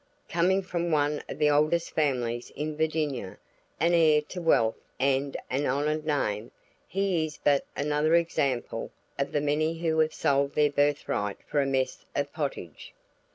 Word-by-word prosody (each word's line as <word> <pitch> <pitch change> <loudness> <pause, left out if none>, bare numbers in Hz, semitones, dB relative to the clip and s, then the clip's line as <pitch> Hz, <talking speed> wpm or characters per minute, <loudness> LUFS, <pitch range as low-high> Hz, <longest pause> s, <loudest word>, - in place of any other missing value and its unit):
Coming 185 +3 +2
from 175 -1 -2
one 150 -1 +1
of - - -5
the 150 -1 +3
oldest 155 +3 +2
families 125 -5 -1
of 150 +2 -2
Virginia, 150 -9 -2 0.4
an 170 +1 +3
heir 155 -3 +5
to 180 - -5
wealth 115 -9 +3 0.2
and 135 +1 +1
an 140 +3 -1
honored 150 +3 0
name, 110 -8 -1 0.4
he 190 -4 0
is 155 -1 -5
but 140 -1 +2
another 150 +3 +2
example 140 -7 0 0.3
of 140 - -1
the 145 - 0
many 155 +3 0
who 160 -1 0
have 155 0 +2
sold 140 0 +1
their 150 -1 +3
birth 145 0 +1
right 105 -1 -1
for 145 - +1
a 135 - 0
mess 130 -1 -1
of 145 0 -1
pottage. 140 - -5
150 Hz, 160 wpm, -28 LUFS, 140-160 Hz, 0.4 s, heir